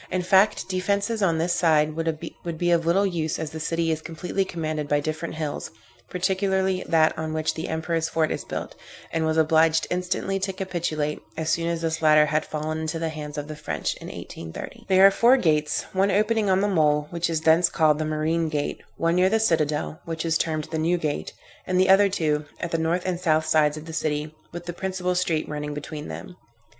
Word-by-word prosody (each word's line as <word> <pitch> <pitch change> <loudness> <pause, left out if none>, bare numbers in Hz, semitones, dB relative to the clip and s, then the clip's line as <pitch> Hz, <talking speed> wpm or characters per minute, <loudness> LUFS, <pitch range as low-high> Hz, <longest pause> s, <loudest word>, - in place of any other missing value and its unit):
In 185 -1 -1
fact 195 +3 +3
defences 200 +4 -1
on 170 -4 +2
this 170 +2 +1
side 155 -3 +3
would 165 +1 -4
be 175 +1 +1
of 165 -1 +2
little 195 +4 +3
use 165 -5 -1
as 155 -1 -4
the 160 - -6
city 165 +1 0
is 160 0 -2
completely 170 +4 -2
commanded 155 -5 -3
by 145 0 +2
different 155 +3 -4
hills, 155 -2 -4 0.4
particularly 190 0 0
that 160 -1 +4
on 160 0 -3
which 155 0 0
the 160 - -5
Emperor's 165 0 -1
fort 160 -1 +1
is - - -3
built, - - -5 0.4
and 160 -1 +1
was 160 0 0
obliged 160 +1 +4
instantly 180 +2 -1
to 190 0 -2
capitulate, 170 -6 -2 0.2
as 160 0 -1
soon 165 0 0
as 165 -1 -2
this 160 0 -1
latter 155 -1 +6
had 150 +1 0
fallen 155 +1 -3
into 160 +1 -3
the 165 0 -2
hands 150 -1 -7
of 145 0 -4
the 155 - -6
French, 150 - -3
in - - -10
1830. 80 -1 -8
There 190 0 +6
are 195 - +8
four 240 +6 +5
gates; 155 - +1
one 195 +1 +2
opening 210 +1 +2
on 190 0 +3
the 205 - +2
mole, 150 -6 +2
which 170 0 -1
is 160 -1 -1
thence 165 +2 +4
called 155 -2 +3
the - - 0
marine 155 +1 0
gate, 150 -2 -2 0.2
one 165 0 +1
near 185 +1 +4
the 220 +2 +2
citadel, 155 -6 0
which 165 0 -4
is 165 -1 +1
termed 155 -2 0
the 160 - -1
new 170 +3 +2
gate; 155 -3 -3 0.4
and 185 0 +1
the 190 0 +4
other 200 +1 +6
two, 155 -5 0
at 170 - -4
the 165 - 0
north 165 +3 0
and 180 -2 -1
south 160 -3 +2
sides 155 -1 +3
of 155 - -8
the 165 - -8
city, 150 -1 -2 0.2
with 175 +1 -7
the 175 - -4
principal 185 0 -2
street 170 -3 0
running 150 -1 -4
between 150 +1 -6
them. 180 - -8
165 Hz, 215 wpm, -25 LUFS, 155-180 Hz, 0.4 s, are